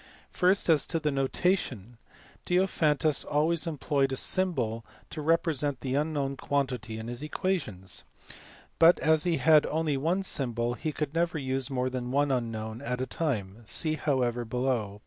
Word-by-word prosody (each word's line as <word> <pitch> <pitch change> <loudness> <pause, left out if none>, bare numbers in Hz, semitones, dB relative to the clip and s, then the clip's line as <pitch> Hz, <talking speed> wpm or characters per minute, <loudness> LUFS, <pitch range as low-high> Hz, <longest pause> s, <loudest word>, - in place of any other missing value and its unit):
First, 185 +2 +2
as 160 -4 +4
to 165 - -1
the 150 -1 0
notation. 135 - -1 0.5
Diophantus 160 -5 +2
always 160 +3 +1
employed 140 -3 0
a - - -1
symbol 130 -9 0 0.3
to 155 - -5
represent 150 -4 +1
the 130 -1 -3
unknown 140 -2 -1
quantity 125 -6 -2
in 110 +1 -6
his 120 +1 -4
equations, 145 - -3 0.8
but 165 +2 +7
as 160 +1 +3
he 170 -2 +2
had 155 -2 +5
only 155 -2 0
one 170 +8 0
symbol 120 -8 -1
he 155 +5 -3
could 150 -1 -3
never 165 0 0
use 135 -1 -2
more 130 -1 -1
than 125 -1 -4
one 140 +2 +2
unknown 115 -3 -3
at 125 +1 -3
a 130 - -1
time 115 - -3
(see, 155 +8 0
however, 125 -6 0
below, 120 -3 -1
p. - - -15
140 Hz, 160 wpm, -28 LUFS, 125-160 Hz, 0.8 s, but